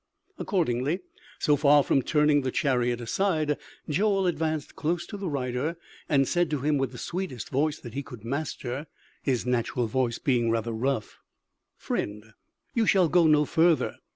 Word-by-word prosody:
Accordingly, 160 - 0 0.4
so 150 - +3
far 145 0 +5
from 135 - +2
turning 150 +1 +3
the 130 - -1
chariot 125 -3 +1
aside, 155 - 0 0.3
Joel 195 +5 +2
advanced 160 -3 -1
close 170 +2 -1
to - - -8
the 195 -3 -3
rider, 135 +3 -2 0.3
and 135 -3 +3
said 175 -2 +1
to 150 -3 -2
him 145 0 +1
with 135 - -1
the - - -10
sweetest 175 - -4
voice 150 +3 0
that 120 - -10
he 140 - -2
could 120 -5 -11
master, 140 +1 -3 0.3
his 130 -4 0
natural 125 0 0
voice 120 +1 0
being 120 -4 +1
rather 115 0 0
rough: 115 0 -2 0.6
"Friend, 105 +1 -4 0.4
you 225 -3 +1
shall 185 -4 +4
go 175 -1 +5
no 150 -1 +5
further! 165 0 +2
145 Hz, 160 wpm, -27 LUFS, 125-160 Hz, 0.6 s, far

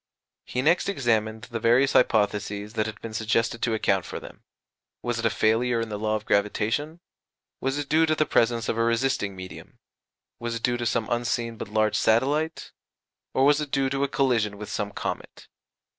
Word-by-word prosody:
He 125 - -2
next 170 +6 +3
examined 110 - 0
the 120 -2 -5
various 125 +5 +3
hypotheses 105 -2 +1
that 110 -1 0
had 110 0 -7
been 115 - -7
suggested 115 +1 0
to 115 -2 +1
account 95 -4 +1
for - - -6
them: - - -12 0.6
Was 120 -1 -1
it 115 - +2
a - - +2
failure 115 +3 +2
in 115 -1 -3
the 105 -1 -4
law 110 0 0
of 105 -1 -4
gravitation? 110 +10 0 0.6
Was 135 +2 -1
it 145 -1 -3
due 160 +2 +3
to 155 - +2
the 155 - +2
presence 115 -3 +2
of 115 - -1
a - - +3
resisting 115 -4 0
medium? 95 0 -10 0.6
Was 120 0 -3
it 115 - -6
due 120 -1 +2
to 120 -1 -2
some 115 -1 0
unseen 120 -1 -1
but - - -6
large 110 +1 +1
satellite? 145 +8 +1 0.6
Or 135 - +4
was 145 +1 +4
it 150 - -4
due 135 -1 0
to 140 0 0
a - - +2
collision 120 -7 +1
with 105 0 -7
some 100 - -2
comet? 100 - -6
115 Hz, 195 wpm, -26 LUFS, 110-135 Hz, 0.6 s, Or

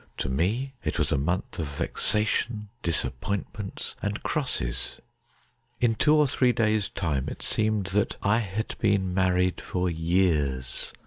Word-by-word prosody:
To - - -2
me 105 - 0
it - - -1
was - - +1
a - - +3
month 85 +6 -2
of 80 - -1
vexa 105 +8 0
tion, 105 -1 -1
disappointments, 95 +5 -2
and 105 +1 -2
crosses. 130 - -2 0.8
In 120 -2 +3
two 150 +7 +4
or 150 -1 +5
three 125 -2 +3
days' 110 -3 +1
time 80 -9 -1
it - - -7
seemed 110 -2 +1
that 105 0 +1
I 105 +3 +4
had 110 0 -3
been 100 -4 +2
married 90 -1 +2
for 90 -1 -1
years. 80 -7 +1
100 Hz, 145 wpm, -27 LUFS, 85-110 Hz, 0.8 s, or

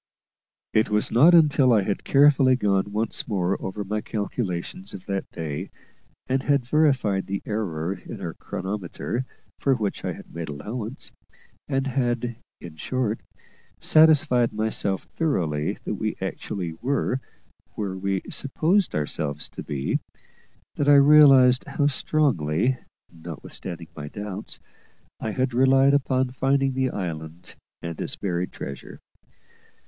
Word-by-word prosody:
It 110 0 +3
was 105 0 +1
not 160 +9 +7
until 150 -5 +5
I 105 -4 +4
had 100 - -2
carefully 135 -2 +5
gone 100 -4 +1
once 110 +2 -1
more 95 -4 0
over 100 +2 -4
my 105 +2 -2
calculations 105 - -4
of 95 - -10
that 100 -1 -3
day, 80 +3 -5 0.6
and 130 +1 0
had 140 -3 +1
verified 130 -9 +2
the 100 0 -3
error 95 -5 -2
in - - -9
our - - -5
chronometer 100 +6 -4 0.3
for 135 -1 +2
which 105 -5 -3
I - - -2
had - - -13
made 85 -1 -5
allowance, 110 - -6 0.6
and 135 -1 0
had, 120 -3 -1 0.2
in 80 -3 -10
short, 115 - -1 0.6
satisfied 150 -6 +5
myself 110 -3 -1
thoroughly 85 - -1
that - - -3
we - - -3
actually 90 -5 -4
were 135 0 0 0.5
where 100 -3 -3
we 95 0 -2
supposed 165 +8 +1
ourselves 75 -1 -2
to - - -8
be, 70 -2 -2 0.8
that 145 0 +2
I 145 - +8
realised 140 -3 +7
how 145 - -1
strongly, 130 - +1 0.3
notwithstanding 85 +1 -8
my 75 -2 -6
doubts, 105 +4 -7 0.6
I 110 - -3
had 130 +3 -1
relied 135 +2 +5
upon 130 -2 +1
finding 135 +1 +1
the 130 0 0
island 85 -3 -6 0.3
and 85 -1 -5
its - - -2
buried 90 -2 -2
treasure. 70 - -8
110 Hz, 135 wpm, -25 LUFS, 95-135 Hz, 0.8 s, I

